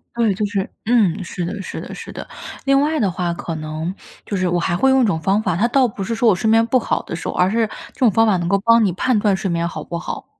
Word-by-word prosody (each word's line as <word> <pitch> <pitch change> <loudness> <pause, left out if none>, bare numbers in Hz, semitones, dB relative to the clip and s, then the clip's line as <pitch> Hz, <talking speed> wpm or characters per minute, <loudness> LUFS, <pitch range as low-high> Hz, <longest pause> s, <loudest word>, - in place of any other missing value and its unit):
对， 225 -4 +2
就 210 +3 -1
是 200 -2 -2 0.2
嗯， 210 -6 +2
是 175 0 -5
的 195 +4 -4
是 - - -6
的 - - -8
是 - - -9
的。 - - -7 0.4
另 275 0 +3
外 310 +2 +1
的 195 -3 +1
话 175 -1 -2
可 170 -1 -5
能 155 +3 -4 0.3
就 200 - -3
是 185 -1 0
我 175 0 +1
还 175 0 0
会 265 +9 +3
用 265 0 +4
一 - - +4
种 165 -6 0
方 195 +5 +1
法， 180 -5 0
它 230 +5 +2
倒 260 +1 +3
不 205 -3 -4
是 230 - -2
说 230 0 +3
我 - - +5
睡 220 +5 0
眠 225 +1 +4
不 255 +2 +3
好 - - -1
的 - - -8
时 165 - -5
候， - - -2
而 180 +1 +2
是 225 -1 +1 0.2
这 - - -22
种 250 -4 +5
方 225 +3 +3
法 200 -4 +3
能 170 -1 -2
够 200 - +3
帮 230 +2 +4
你 180 - 0
判 240 +3 +1
断 205 -2 +2
睡 190 -1 -3
眠 170 0 0
好 - - -6
不 170 -1 -5
好。 - - -6
200 Hz, 325 characters per minute, -20 LUFS, 175-230 Hz, 0.4 s, 我